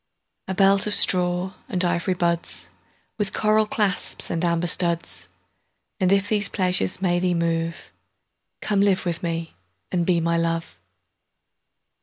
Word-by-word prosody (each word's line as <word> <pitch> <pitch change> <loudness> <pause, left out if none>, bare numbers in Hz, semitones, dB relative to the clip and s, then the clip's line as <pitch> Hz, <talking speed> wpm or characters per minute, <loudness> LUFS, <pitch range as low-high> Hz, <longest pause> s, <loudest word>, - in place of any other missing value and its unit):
A 190 - -3
belt 195 +1 +3
of 210 - +5
straw 180 +1 +3 0.2
and 180 0 0
ivy 175 +1 0
budsWith 175 +4 -2
coral 215 0 +2
clasps 205 -4 -1
and 165 0 -2
amber 170 0 0
studs:And 175 +2 -4
if 200 0 +2
these 205 -1 +1
pleasures 185 0 +1
may 175 -1 +1
thee 180 -1 0
move, 165 0 -2 0.7
Come 205 -2 0
live 195 -2 +1
with 170 -2 -3
me 165 -1 -4 0.4
and 175 -2 0
be 175 0 +1
my 170 0 0
Love. 165 0 -3
180 Hz, 130 wpm, -23 LUFS, 170-195 Hz, 0.7 s, of